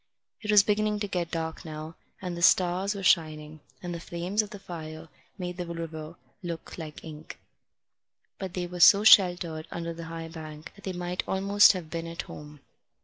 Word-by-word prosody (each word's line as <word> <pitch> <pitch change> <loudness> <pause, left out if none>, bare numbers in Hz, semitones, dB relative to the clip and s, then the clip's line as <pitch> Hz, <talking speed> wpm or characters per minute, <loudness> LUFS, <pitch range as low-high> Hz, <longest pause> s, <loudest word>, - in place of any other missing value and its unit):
It 210 - -7
was 210 -1 +7
beginning 210 0 +1
to 205 - -1
get 175 -4 -2
dark 160 0 -4
now, 155 -1 -7 0.3
and 180 -1 -3
the 170 - -6
stars 185 +3 +3
were 195 - -6
shining, 155 -3 +1 0.2
and 175 -1 -4
the 170 - -5
flames 175 +5 -1
of 210 - -7
the 205 - -8
fire 160 -4 -8 0.3
made 180 -2 -5
the 180 - -3
river 165 -1 -6 0.3
look 170 -3 -6
like 155 -2 -8
ink. 155 -1 -10 1.0
But 190 -2 -5
they 180 -1 -2
were 180 0 -7
so 200 +3 +8
sheltered 175 -6 +5
under 170 0 -4
the 165 0 -8
high 165 0 -6
bank 155 -1 -9
that 200 - -15
they 190 - -3
might 180 0 -2
almost 200 +2 +5
have 170 -4 -7
been 165 0 -4
at 165 0 -5
home. 150 -1 -11
170 Hz, 190 wpm, -28 LUFS, 160-190 Hz, 1.0 s, so